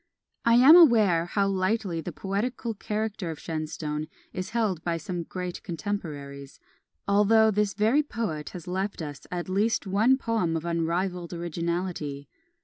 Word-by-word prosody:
I 230 Hz, 0 st, +5 dB
am 265 Hz, +7 st, +9 dB
aware 215 Hz, -, +6 dB
how 200 Hz, +2 st, +1 dB
lightly 190 Hz, -2 st, 0 dB
the -, -, -5 dB
poetical 225 Hz, +4 st, -3 dB
character 210 Hz, -3 st, -3 dB
of 160 Hz, -, -5 dB
Shenstone 155 Hz, -1 st, -4 dB, 0.3 s
is 185 Hz, 0 st, -4 dB
held 210 Hz, -8 st, -1 dB
by 170 Hz, -1 st, -1 dB
some 175 Hz, +2 st, -4 dB
great 180 Hz, +1 st, -5 dB
contemporaries 150 Hz, -6 st, -6 dB, 0.5 s
although 215 Hz, +2 st, +5 dB
this 210 Hz, -1 st, 0 dB
very 220 Hz, +8 st, +3 dB
poet 215 Hz, -, -4 dB
has 175 Hz, -3 st, -9 dB
left 190 Hz, 0 st, -3 dB
us 145 Hz, -2 st, -8 dB
at 175 Hz, -1 st, -4 dB
least 210 Hz, +5 st, +1 dB
one 215 Hz, +7 st, +3 dB
poem 220 Hz, -10 st, 0 dB
of 160 Hz, -, -6 dB
unrivalled 170 Hz, +1 st, -1 dB
originality. 170 Hz, -4 st, -3 dB
185 Hz, 140 wpm, -27 LUFS, 165-215 Hz, 0.5 s, am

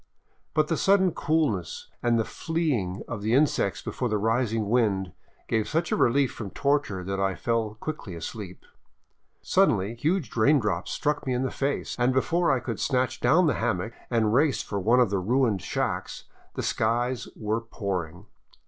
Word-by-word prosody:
But 155 Hz, 0 st, +3 dB
the 165 Hz, -, 0 dB
sudden 190 Hz, -2 st, +4 dB
coolness 145 Hz, -, -1 dB
and 120 Hz, -1 st, +2 dB
the 110 Hz, -, +1 dB
fleeing 140 Hz, -, -2 dB
of 115 Hz, -3 st, -5 dB
the 110 Hz, +3 st, +1 dB
insects 135 Hz, -8 st, +1 dB
before 125 Hz, -, -2 dB
the 105 Hz, -, +1 dB
rising 115 Hz, 0 st, 0 dB
wind 100 Hz, -5 st, +1 dB, 0.4 s
gave 110 Hz, -1 st, 0 dB
such 165 Hz, +2 st, 0 dB
a -, -, +3 dB
relief 135 Hz, +2 st, +3 dB
from 105 Hz, -4 st, -6 dB
torture 140 Hz, -8 st, 0 dB
that 95 Hz, +1 st, -3 dB
I 95 Hz, -1 st, +1 dB
fell 110 Hz, +2 st, -1 dB
quickly 130 Hz, -, -5 dB
asleep. 95 Hz, +2 st, -7 dB, 0.8 s
Suddenly 100 Hz, +4 st, +2 dB
huge 150 Hz, -, -1 dB
raindrops 110 Hz, -, +2 dB
struck 150 Hz, -1 st, -1 dB
me 130 Hz, -, +1 dB
in 125 Hz, -, 0 dB
the 130 Hz, -, -1 dB
face, 140 Hz, +1 st, -2 dB
and 125 Hz, +2 st, +3 dB
before 170 Hz, +6 st, +2 dB
I 135 Hz, -, +2 dB
could 115 Hz, -3 st, -5 dB
snatch 125 Hz, -1 st, 0 dB
down 160 Hz, +9 st, +4 dB
the 150 Hz, -, +3 dB
hammock 110 Hz, -1 st, -1 dB, 0.2 s
and 110 Hz, -3 st, +2 dB
race 140 Hz, +2 st, +2 dB
for 100 Hz, -, -3 dB
one 115 Hz, +6 st, +3 dB
of 120 Hz, -5 st, +3 dB
the 100 Hz, -, +1 dB
ruined 115 Hz, 0 st, +1 dB
shacks, -, -, -3 dB, 0.3 s
the -, -, -3 dB
skies 120 Hz, +2 st, 0 dB
were 110 Hz, +1 st, -2 dB
pouring. 95 Hz, -5 st, -4 dB
115 Hz, 170 wpm, -26 LUFS, 100-140 Hz, 0.8 s, sudden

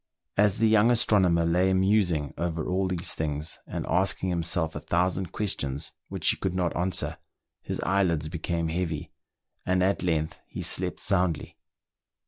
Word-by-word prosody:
As 105 Hz, -1 st, +3 dB
the 115 Hz, -, +3 dB
young 110 Hz, +1 st, +5 dB
astronomer 95 Hz, -8 st, +4 dB
lay 90 Hz, +3 st, +3 dB
musing 95 Hz, -6 st, +2 dB
over 85 Hz, -2 st, -2 dB
all 95 Hz, +1 st, 0 dB
these 90 Hz, -2 st, -1 dB
things, 75 Hz, +1 st, -3 dB
and -, -, -4 dB
asking 95 Hz, 0 st, +1 dB
himself 85 Hz, -2 st, 0 dB
a -, -, -3 dB
thousand 90 Hz, +3 st, 0 dB
questions 75 Hz, -10 st, -3 dB, 0.2 s
which -, -, -4 dB
he -, -, -4 dB
could 95 Hz, -2 st, -2 dB
not 90 Hz, -2 st, 0 dB
answer, 90 Hz, +3 st, -2 dB, 0.4 s
his -, -, -4 dB
eyelids 85 Hz, -5 st, +1 dB
became 85 Hz, 0 st, -2 dB
heavy, 80 Hz, -2 st, -3 dB, 0.5 s
and 90 Hz, 0 st, +1 dB
at 95 Hz, +2 st, +1 dB
length 80 Hz, -3 st, -1 dB
he -, -, -6 dB
slept -, -, +1 dB
soundly. 90 Hz, -5 st, 0 dB
90 Hz, 150 wpm, -27 LUFS, 80-95 Hz, 0.5 s, young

